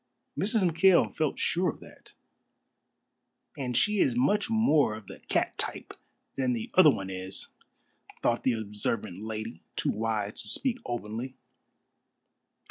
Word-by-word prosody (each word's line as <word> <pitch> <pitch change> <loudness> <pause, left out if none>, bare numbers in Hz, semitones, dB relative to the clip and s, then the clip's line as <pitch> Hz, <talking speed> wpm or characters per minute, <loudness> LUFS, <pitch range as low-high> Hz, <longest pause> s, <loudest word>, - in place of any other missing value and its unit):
Mrs. 205 -1 +2
McKail 175 +2 +4
felt 155 -3 0
sure 180 +1 +1
of - - -6
that. - - -16 1.4
"And 125 -3 -2
she 210 -1 +2
is 125 -8 +3
much 175 - +2
more 155 - +3
of 110 -1 -10
the - - -11
cat - - +1
type - - -3 0.4
than 130 -2 +1
the 115 -2 -4
other 185 -4 +8
one 95 -8 -2
is," 95 +1 -3 0.7
thought 120 - +2
the 130 - +3
observant 105 -2 -3
lady, 110 -4 -5
too - - +1
wise 110 -1 -2
to - - -6
speak 255 - +1
openly. 120 +2 -4
120 Hz, 135 wpm, -29 LUFS, 105-170 Hz, 1.4 s, other